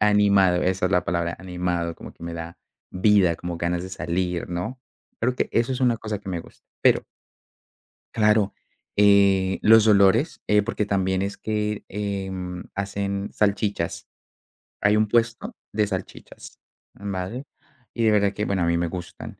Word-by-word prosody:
animado, 100 -3 +4
esa 90 0 +1
es - - -3
la 90 - +2
palabra, 85 0 -1
animado, 90 -2 -2
como - - -11
que - - -18
me 85 - -5
da 85 +1 -7 0.3
vida 95 -3 +3
como 85 -1 -5
ganas 85 +1 -1
de - - -7
salir, 90 -1 -2
¿no?, 110 +9 -4 0.4
creo 125 +2 0
que - - 0
eso 115 +3 +1
es 130 - -1
una 120 -2 +3
cosa 110 -3 -4
que 100 - -11
me 85 -2 -2
gusta, - - -18 0.2
pero - - +4 1.1
Claro, 105 -2 +3 0.4
eh, 100 -2 +4
los 110 0 +7
olores, 105 +6 +4
eh, 105 -1 +4
porque 105 -1 -2
también 95 -1 0
es 100 +1 -3
que, 105 -1 -2
em, 95 -3 -4
hacen 100 0 -3
salchichas. 105 0 -1 0.7
Hay 105 0 +4
un 110 - +2
puesto 120 - 0 0.2
de 105 0 +2
salchichas, 95 -2 -7 0.4
vale, 100 +6 -5 0.5
y 115 -1 0
de 110 - +5
verdad 100 -1 +3
que 105 - -2
bueno, 95 -4 0
a - - +2
mí 85 0 +2
me 85 0 0
gustan. 90 +1 -8
100 Hz, 165 wpm, -24 LUFS, 90-105 Hz, 1.1 s, los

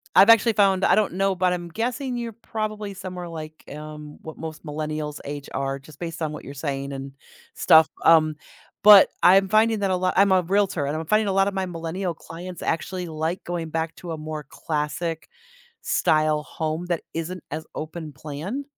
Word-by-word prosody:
I've 195 +4 +8
actually 230 0 +6
found 195 -2 +3
I - - +5
don't 215 -4 +1
know, 195 0 +1
but 180 0 +2
I'm 175 -1 -5
guessing 245 - -2
you're 235 -2 -4
probably 215 -2 -4
somewhere, 180 -2 -7
like, 155 -1 -8
um, 150 0 -9
what 160 - -9
most 160 0 -8
millennials 150 0 -4
age 145 0 -6
are 135 0 -2
just 145 +2 -16
based 165 -1 -5
on 155 -1 -2
what - - -8
you're 140 - -8
saying 140 -1 -4
and 135 0 -7 0.4
stuff, 160 0 +6 0.2
um, 155 -2 +5 0.5
but, 205 -2 +9
I'm 195 +1 +6
finding 220 +1 +3
that 195 -2 0
a - - +2
lot 185 0 0
I'm 200 0 +5
a 185 -1 +5
realtor 185 -4 +1
and 150 - -2
I'm 160 - -4
finding 215 +3 +2
a 195 - 0
lot 195 +1 +3
of 200 - -2
my 190 -1 -1
millennial 170 +1 -3
clients 175 +2 -9
actually 180 +2 -2
like 160 +3 -3
going 170 -2 -4
back 160 0 -2
to 175 - -7
a 160 - -4
more 155 -2 -6
classic 155 +1 -3 0.5
style 155 -1 +2
home 160 +2 -3
that 175 -2 -1
isn't 165 +2 -4
as 155 +2 -5
open 155 -1 -6
plan, 155 - -5
165 Hz, 195 wpm, -24 LUFS, 155-195 Hz, 0.5 s, but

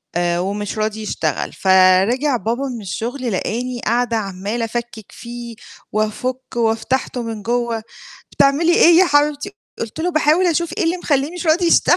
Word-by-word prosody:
آآ 175 0 +1
ومش 200 +3 -3
راضي 215 0 -2
يشتغل، 215 - -2
فرِجِع 190 +9 +4
بابا 230 +6 -2
من 230 - -7
الشغل، 240 +5 -4
لقاني 240 +5 -2
قاعدة 235 0 +1
عمّالة 205 +3 -3
أفكّك 230 -2 -6
فيه، 235 0 -8 0.4
وأفكه 250 +4 -2
وفتحته 235 +3 0
من 225 -2 -5
جوّا، 235 0 -1 0.5
"بتعملي 315 +5 +3
إيه 340 -1 +6
يا 370 - +7
حبيبتي؟" 295 +3 +1 0.3
قُلت 230 +7 -5
له: 350 +2 0
"باحاول 310 +3 +3
أشوف 340 0 0
إيه 395 - +1
اللي 330 +2 +1
مخلّيه 285 -4 0
مش 355 -1 -5
راضي 335 +3 +3
يشتغل." 335 - +4
240 Hz, 155 wpm, -19 LUFS, 215-290 Hz, 0.5 s, يا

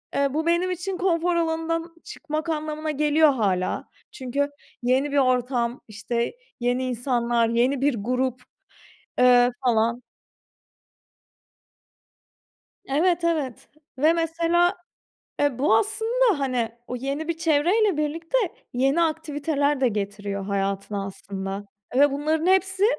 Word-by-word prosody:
eee, 280 -1 +1
bu 320 +1 -1
benim 345 +2 +2
için 365 +1 -3
konfor 350 -1 +1
alanından 330 0 -1
çıkmak 315 +1 -5
anlamına 310 0 -2
geliyor 300 +1 +4
hâlâ. 190 -6 -1 0.2
Çünkü, 280 +2 -2 0.3
yeni 265 +3 +2
bir 285 - 0
ortam, 250 -2 +1
işte, 235 - -3 0.2
yeni 245 +1 0
insanlar, 240 -2 0
yeni 250 +3 +1
bir 285 -3 +2
grup, 250 +3 -1 0.8
eee, 245 -1 +6
falan. 235 0 +2 2.8
Evet, 340 +5 +1
evet 305 -8 -2 0.3
ve 310 +4 +4
mesela, 335 +2 +1 0.6
e, 285 -4 +1
bu 240 -5 +4
aslında, 445 - +2
hani, 250 -4 0 0.2
o 250 - -4
yeni 275 +5 -4
bir 335 - -1
çevreyle 340 +5 +2
birlikte, 330 +8 -2 0.4
yeni 270 +7 +2
aktiviteler 295 -3 0
de 255 - +4
getiriyor 200 -1 -4
hayatına 200 0 -2
aslında 195 +1 -6 0.3
ve 285 +1 +6
bunların 310 +4 0
hepsi, 380 +1 +3
285 Hz, 115 wpm, -24 LUFS, 245-330 Hz, 2.8 s, eee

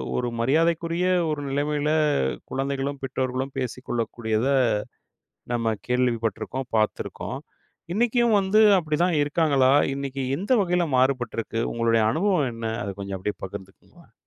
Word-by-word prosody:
ஒரு 125 - 0
மரியாதைக்குரிய 165 +6 +1 0.2
ஒரு 150 -1 -2
நிலைமையில 145 +2 0 0.6
குழந்தைகளும் 135 +1 -2
பெற்றோர்களும் 130 +1 -3
பேசிக்கொள்ளக் 120 -2 -3
கூடியத, 110 +1 0 1.1
நம்ம 115 -2 0
கேள்விப்பட்டிருக்கோம், 120 0 -1
பார்த்துருக்கோம். 110 0 -2 0.5
இன்னைக்கும் 235 +1 +2
வந்து 195 +2 +2 0.2
அப்டிதான் 165 +2 0
இருக்காங்களா? 145 -3 +3 0.2
இன்னைக்கி 135 -1 -4 0.2
எந்த 200 +7 -4
வகையில 180 -2 +1
மாறுபட்டிருக்கு? 120 -3 0
உங்களுடைய 115 -1 +2
அனுபவம் 175 - +1
என்ன? 115 0 -4 0.2
அத 100 - -4
கொஞ்சம் 100 -1 -4
அப்படியே 95 +1 -4
பகிர்ந்துக்குங்களேன். 95 0 -12
135 Hz, 110 wpm, -24 LUFS, 115-160 Hz, 1.1 s, இருக்காங்களா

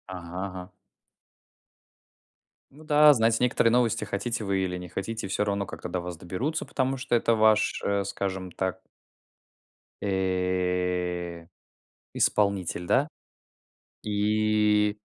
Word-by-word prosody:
Ага 90 +1 -6
ага. 90 -1 -8 2.0
Ну 150 +3 -15
да, 150 -1 +6
знаете 115 -2 +2
некоторые 120 -2 +3
новости, 120 -2 +2
хотите 115 +3 -3
вы 100 -1 0
или 90 -1 -3
не 90 0 -8
хотите, 100 +4 -4
всё 105 - 0
равно, 100 -1 -1
как-то - - -7
до 90 - -3
вас 90 -1 -6
доберутся, 115 - -3
потому 135 0 -1
что 125 -2 0
это 115 0 +3
ваш, 110 -1 +3
э, 100 0 +1
скажем 95 -1 -4
так 95 +1 -3 1.2
Э, 90 -2 -1 0.7
исполнитель, 95 -4 +1
да? 145 - +2 1.0
И 105 0 +2
100 Hz, 115 wpm, -27 LUFS, 90-115 Hz, 2.0 s, да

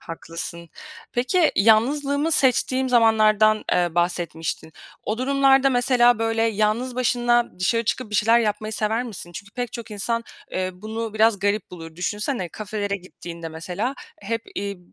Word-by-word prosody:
Haklısın. 165 0 -7 0.4
Peki, 260 +8 +2
yalnızlığımı 280 +8 +3
seçtiğim 260 0 +2
zamanlardan, 215 -2 +4
eee, 175 -2 +1
bahsetmiştin. 170 -2 -2 0.3
O 215 +2 -3
durumlarda, 270 0 +4
mesela, 245 -1 +4
böyle, 225 0 0
yalnız 225 +3 0
başına 240 -3 +1
dışarı 230 +5 +1
çıkıp 225 0 -2
bir - - -6
şeyler 225 +3 +4
yapmayı 215 0 -2
sever 220 +2 0
misin? 200 -7 -8
Çünkü 200 +3 -10
pek 245 0 -4
çok 235 -1 -7
insan, 230 +3 -2 0.3
eee, 185 0 -2
bunu 220 +3 -5
biraz 220 -1 +3
garip 205 +2 -1
bulur. 165 -2 -10
Düşünsene, 205 +1 -2
kafelere 205 0 -3
gittiğinde, 170 -2 -9
mesela, 180 +11 -4 0.3
hep, 225 +2 -3
iii, 200 -1 -4
220 Hz, 140 wpm, -23 LUFS, 195-240 Hz, 0.4 s, zamanlardan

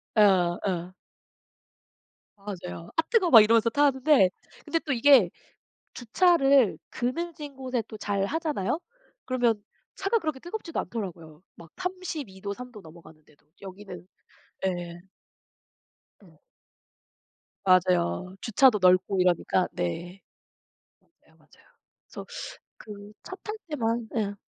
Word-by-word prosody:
예 215 - +5
아 180 -4 +4
어. 180 -2 -3 1.4
맞아요. 180 -4 -8
"앗 325 0 0
뜨거워." 430 -7 +3
막 230 -4 +11
이러면서 225 +1 +4
타는데 275 -4 +4 0.4
근데 330 +2 0
또 300 -3 -3
이게 245 -5 +6 0.7
주차를 275 - +3
그늘진 295 +2 -4
곳에 255 -2 -2
또 215 - -8
잘 200 -2 -1
하잖아요? 305 - -2 0.4
그러면 240 -5 0 0.3
차가 390 +4 +1
그렇게 310 -8 -3
뜨겁지도 350 0 -6
않더라고요 170 -8 -7
막 170 -1 -14
32 360 - -5
도 200 - -3
3 250 +3 -9
도 210 - -11
넘어가는데도. 155 -3 -17 0.2
여기는 190 -2 -10 0.6
예. 175 -2 -4 1.2
예. - - -21 1.3
맞아요. 185 - +2
주차도 230 0 +4
넓고 185 +1 +3
이러니까 180 0 +2
네. 175 - -4 0.8
맞아요, - - -31
맞아요. - - -25 0.4
그래서 - - -9 0.5
그 205 -1 -11
차 375 - -8
탈 430 - -5
때만 230 -6 -2
예. 205 -2 -1
215 Hz, 235 characters per minute, -27 LUFS, 185-280 Hz, 1.4 s, 막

